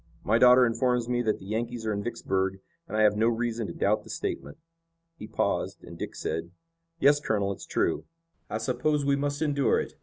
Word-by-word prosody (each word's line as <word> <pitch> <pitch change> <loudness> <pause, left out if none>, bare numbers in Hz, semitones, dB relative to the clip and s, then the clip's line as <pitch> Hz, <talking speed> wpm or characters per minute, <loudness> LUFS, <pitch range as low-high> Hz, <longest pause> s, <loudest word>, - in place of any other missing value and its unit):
My 110 +3 +3
daughter 125 +1 +7
informs 120 0 +1
me 120 0 +1
that 110 -3 0
the 95 - -13
Yankees 115 +2 -3
are 110 - 0
in 100 - -2
Vicksburg, 95 -4 -1 0.3
and 110 - -3
I 110 - +4
have 105 -1 +5
no 110 +2 +3
reason 115 -1 -1
to - - -6
doubt 105 +1 +1
the - - -15
statement." - - -4 0.6
He 110 - -9
paused, - - -1
and - - -10
Dick - - -6
said: 80 +1 -3 0.5
"Yes, 145 -1 +5
Colonel, 100 -7 0
it's 95 - -8
true." - - 0 0.4
"I 110 - -2
suppose 130 +6 0
we 140 0 +3
must 145 +2 -1
endure 140 -3 +2
it. - - -5
115 Hz, 205 wpm, -28 LUFS, 105-125 Hz, 0.6 s, daughter